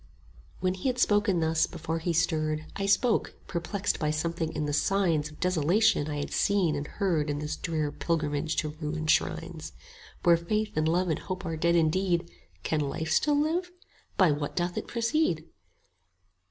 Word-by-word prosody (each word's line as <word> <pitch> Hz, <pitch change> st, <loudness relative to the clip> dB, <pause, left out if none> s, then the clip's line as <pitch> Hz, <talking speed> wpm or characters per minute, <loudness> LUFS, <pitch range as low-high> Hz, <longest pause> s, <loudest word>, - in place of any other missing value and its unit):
When 185 Hz, -1 st, +1 dB
he 190 Hz, +8 st, -1 dB
had 250 Hz, -, -2 dB
spoken 205 Hz, -6 st, +3 dB
thus, 160 Hz, 0 st, +2 dB
before 165 Hz, -1 st, -4 dB
he 170 Hz, +2 st, -1 dB
stirred, 155 Hz, -2 st, +1 dB
25 -, -, -6 dB
I -, -, 0 dB
spoke, 230 Hz, +3 st, +2 dB
perplexed 195 Hz, +3 st, -2 dB
by 150 Hz, -, 0 dB
something 160 Hz, +1 st, -1 dB
in 155 Hz, -1 st, -2 dB
the 145 Hz, -, -2 dB
signs 165 Hz, -2 st, +1 dB
Of 155 Hz, -, -16 dB
desolation 180 Hz, -1 st, +2 dB
I 150 Hz, -, -3 dB
had 145 Hz, -, -4 dB
seen 190 Hz, -6 st, +2 dB
and 145 Hz, +1 st, -4 dB
heard 170 Hz, -7 st, 0 dB
In 145 Hz, -, -1 dB
this 150 Hz, +1 st, -3 dB
drear 155 Hz, -3 st, -2 dB
pilgrimage 155 Hz, -1 st, -1 dB
to 155 Hz, -, 0 dB
ruined 155 Hz, +1 st, -2 dB
shrines: 165 Hz, 0 st, -1 dB, 0.5 s
Where 170 Hz, -1 st, +6 dB
Faith 210 Hz, +6 st, -2 dB
and 155 Hz, 0 st, +1 dB
Love 175 Hz, +2 st, +1 dB
and 160 Hz, -, 0 dB
Hope 185 Hz, 0 st, -5 dB
are 165 Hz, -1 st, -2 dB
dead 170 Hz, +2 st, +2 dB
indeed, 170 Hz, +1 st, +1 dB, 0.3 s
Can 155 Hz, -, 0 dB
Life 155 Hz, +2 st, -2 dB
still 290 Hz, -, +3 dB
live? 335 Hz, +4 st, 0 dB, 0.5 s
By 185 Hz, -5 st, +5 dB
what 145 Hz, 0 st, -3 dB
doth 175 Hz, 0 st, -1 dB
it -, -, -4 dB
proceed? 235 Hz, -, 0 dB
165 Hz, 180 wpm, -28 LUFS, 155-190 Hz, 0.5 s, Where